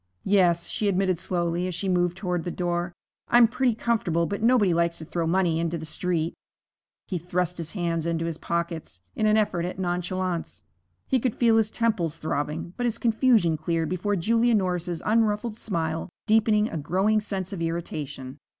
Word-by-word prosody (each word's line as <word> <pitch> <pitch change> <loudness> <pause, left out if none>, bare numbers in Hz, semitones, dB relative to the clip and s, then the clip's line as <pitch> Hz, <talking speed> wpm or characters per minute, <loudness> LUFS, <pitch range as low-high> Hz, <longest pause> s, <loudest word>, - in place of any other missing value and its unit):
'Yes,' 180 -4 +3
she 210 - -2
admitted 185 -3 +1
slowly, 175 0 -1
as 180 - -3
she 195 - -3
moved 175 -1 +1
toward 180 -4 -2
the 175 - -3
door. 175 0 -2 0.4
'I'm 240 -1 +6
pretty 250 0 +1
comfortable, 195 -8 0
but 200 +4 -3
nobody 225 -6 +4
likes 170 0 +1
to 160 - -8
throw 165 +1 -2
money 170 -2 +2
into 170 0 -1
the 160 - -7
street.' 165 0 -1 0.7
He 185 -4 -2
thrust 180 +1 -2
his 165 -1 -5
hands 170 -4 -1
into 165 0 -1
his 165 -1 -4
pockets 170 - -3
in 215 - +1
an 215 0 +4
effort 190 -5 +1
at 180 +1 -4
nonchalance. 180 -1 -2 0.4
He 260 - +2
could 240 -1 -1
feel 230 -2 +4
his 220 -1 +3
temples 205 -10 0
throbbing. 155 +2 -3
But 245 - 0
his 230 - -1
confusion 225 - +3
cleared 165 +1 -1
before 195 +3 -1
Julia 230 +6 +2
Norris's 180 -4 -1
unruffled 215 0 +1
smile, 165 -5 -2 0.2
deepening 215 -1 +3
a 165 - -4
growing 190 +8 +1
sense 195 -2 -3
of 180 - -5
irritation. 150 -5 -4
180 Hz, 175 wpm, -26 LUFS, 170-210 Hz, 0.7 s, I'm